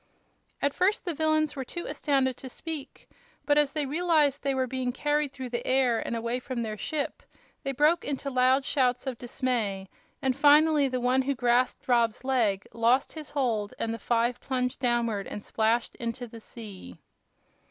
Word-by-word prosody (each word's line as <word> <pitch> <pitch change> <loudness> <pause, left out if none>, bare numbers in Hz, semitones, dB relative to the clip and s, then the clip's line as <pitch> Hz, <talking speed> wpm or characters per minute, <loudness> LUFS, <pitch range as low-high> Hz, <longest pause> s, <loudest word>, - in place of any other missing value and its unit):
At 285 0 +2
first 380 +3 +1
the 345 - -1
villains 310 0 +1
were 270 - -3
too 345 +7 -6
astounded 270 -3 0
to 260 - -8
speak, 305 +1 -7 0.4
but 290 0 +3
as 295 -1 +3
they 300 -2 0
realized 300 -2 +2
that 280 - -1
they 270 - +1
were 260 -1 +1
being 255 0 -2
carried 295 +2 0
through 260 -2 -6
the 240 0 -3
air 255 -3 +3
and - - -3
away 235 +2 -2
from 250 -2 -4
their 215 -1 -3
ship 290 +6 -3 0.4
they 275 - -2
broke 300 +6 +3
into 275 0 -3
loud 260 +1 +3
shouts 250 -3 +1
of 260 -3 -4
dismay, 225 -6 -2 0.3
and 265 -2 0
finally 295 +1 +5
the 255 -1 -2
one 250 +2 +2
who 275 +1 -1
grasped 245 +1 +1
Rob's 235 -2 +2
leg 230 -7 +1
lost 235 +3 +2
his 310 -2 -8
hold 235 -8 -1
and 225 - -2
the 230 - -5
five 235 +3 +1
plunged 250 -1 -2
downward 235 -5 0
and 210 - -6
splashed 225 +2 0
into 235 0 -4
the 230 -1 -11
sea. 205 - -10
255 Hz, 185 wpm, -28 LUFS, 235-285 Hz, 0.4 s, finally